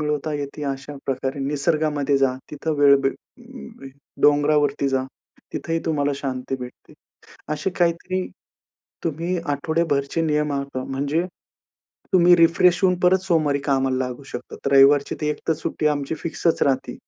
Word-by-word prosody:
मिळवता 150 Hz, 0 st, -2 dB
येते. 145 Hz, +1 st, -5 dB
अशा 140 Hz, +1 st, -5 dB
प्रकारे 135 Hz, +1 st, -2 dB
निसर्गामध्ये 145 Hz, 0 st, 0 dB
जा, 135 Hz, -2 st, +2 dB, 0.2 s
तिथं 155 Hz, +1 st, -3 dB
वेळ 140 Hz, -1 st, +7 dB
भे 135 Hz, -, +3 dB, 1.1 s
डोंगरावरती 145 Hz, -1 st, +3 dB
जा, 135 Hz, -1 st, 0 dB, 0.5 s
तिथं -, -, -4 dB
ही 165 Hz, -, +2 dB
तुम्हाला 145 Hz, -3 st, +1 dB
शांती 130 Hz, -1 st, -4 dB
भेटते. 125 Hz, 0 st, -10 dB, 0.6 s
असे 155 Hz, +5 st, -2 dB
काहीतरी 175 Hz, +2 st, 0 dB, 0.8 s
तुम्ही 165 Hz, +3 st, -2 dB
आठवडेभरचे 145 Hz, 0 st, 0 dB
नियम 150 Hz, -2 st, 0 dB
आखा, 140 Hz, -2 st, -4 dB
म्हणजे 140 Hz, +5 st, -1 dB, 0.9 s
तुम्ही 175 Hz, -1 st, +6 dB
रिफ्रेश 175 Hz, +2 st, +4 dB
होऊन 180 Hz, -2 st, +3 dB
परत 185 Hz, +1 st, +5 dB
सोमवारी 155 Hz, -5 st, +2 dB
कामाला 135 Hz, -1 st, +1 dB
लागू 125 Hz, +2 st, -7 dB
शकतात. 120 Hz, +2 st, -6 dB
रविवारची 140 Hz, +1 st, +5 dB
ती 150 Hz, -, -1 dB
एक -, -, -3 dB
तर -, -, +5 dB
सुट्टी 155 Hz, -, -2 dB
आमची 145 Hz, 0 st, -2 dB
फिक्सच 165 Hz, 0 st, -1 dB
राहते 135 Hz, -2 st, 0 dB
145 Hz, 135 wpm, -22 LUFS, 140-165 Hz, 1.1 s, वेळ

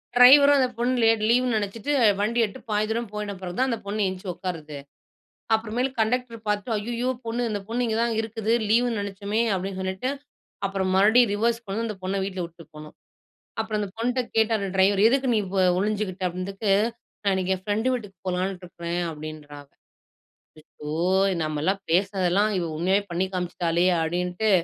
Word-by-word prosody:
Driver 280 Hz, +4 st, +8 dB
அந்தப் 255 Hz, -3 st, +1 dB
பொண்ணு 245 Hz, +2 st, +1 dB
leave 225 Hz, 0 st, +5 dB
லே 235 Hz, -, +6 dB, 0.2 s
நெனைச்சுட்டு 215 Hz, +5 st, -2 dB, 0.3 s
வண்டி 220 Hz, +4 st, 0 dB
ஏட்டு 215 Hz, +5 st, -9 dB
பாதி 210 Hz, 0 st, +1 dB
தூரம் 230 Hz, 0 st, -2 dB
போயிட்ட 210 Hz, -1 st, -4 dB
பிறகு 180 Hz, -1 st, -6 dB
தான் 260 Hz, -, +2 dB
அந்தப் 230 Hz, -3 st, -3 dB
பொண்ணு 205 Hz, 0 st, -1 dB
எந்திரிச்சு 185 Hz, 0 st, -4 dB
உக்காருது. 160 Hz, -6 st, -6 dB, 0.8 s
அப்புறம் 220 Hz, 0 st, -1 dB
மேல் 255 Hz, +2 st, +1 dB
கண்டக்டர் 230 Hz, +1 st, 0 dB
பாத்து. 205 Hz, +1 st, -1 dB
அய்யய்யோ 235 Hz, +4 st, -2 dB, 0.2 s
பொண்ணு. 230 Hz, +2 st, -2 dB
அந்தப் 205 Hz, -2 st, -4 dB
பொண்ணு 240 Hz, +2 st, -1 dB
இங்க 225 Hz, -1 st, -1 dB
தான் 235 Hz, 0 st, +1 dB
இருக்குது. 225 Hz, 0 st, -3 dB, 0.2 s
லீவுன்னு 235 Hz, 0 st, +2 dB
நெனைச்சமே 200 Hz, +2 st, -2 dB
அப்டின்னு 190 Hz, +1 st, -4 dB
சொல்லிட்டு 190 Hz, +6 st, -2 dB, 0.6 s
அப்புறம் 190 Hz, -1 st, -1 dB, 0.4 s
ரிவெர்ஸ் 230 Hz, +3 st, +1 dB
கொண்டு 205 Hz, +4 st, -2 dB
அந்தப் 210 Hz, -4 st, -6 dB
பொண்ண 190 Hz, +1 st, -2 dB
வீட்ல 190 Hz, -1 st, -4 dB
விட்டுப் 165 Hz, -2 st, -15 dB
போனோம். 150 Hz, 0 st, -11 dB, 0.7 s
அப்புறம் 220 Hz, -1 st, -2 dB
அந்தப் 200 Hz, -2 st, -5 dB
பொண்ணுட்ட 250 Hz, +3 st, 0 dB
கேட்டார் 220 Hz, -2 st, +2 dB
டிரைவரு, 195 Hz, +1 st, +4 dB
எதுக்கு 265 Hz, +1 st, +1 dB
நீ -, -, +3 dB, 0.4 s
ஒளிஞ்சுக்கிட்ட 200 Hz, -2 st, -2 dB
அப்டினதுக்கு 195 Hz, +4 st, -3 dB
அதுக்கு 230 Hz, -2 st, -6 dB
நான் 190 Hz, -1 st, +2 dB
என் 185 Hz, -, -12 dB
ஃபிரன்ட் 215 Hz, +4 st, -1 dB
வீட்டுக்குப் 205 Hz, -7 st, -7 dB
போலான்னு 185 Hz, +1 st, -1 dB
இருக்கிறேன் 175 Hz, 0 st, -4 dB
அப்டின்றா 155 Hz, -1 st, -9 dB
அவ 140 Hz, -, -27 dB, 0.9 s
அச்சோ! 150 Hz, -1 st, -10 dB, 0.5 s
நமெல்லாம் 155 Hz, +6 st, -1 dB
பேசதெல்லாம் 190 Hz, +2 st, +2 dB, 0.3 s
உண்மையாவே 190 Hz, +5 st, +2 dB
பண்ணி 180 Hz, +2 st, 0 dB
காமிச்சிட்டாலே 175 Hz, -1 st, 0 dB, 0.2 s
அப்டின்ட்டு 180 Hz, +5 st, -1 dB
205 Hz, 160 wpm, -25 LUFS, 185-225 Hz, 0.9 s, Driver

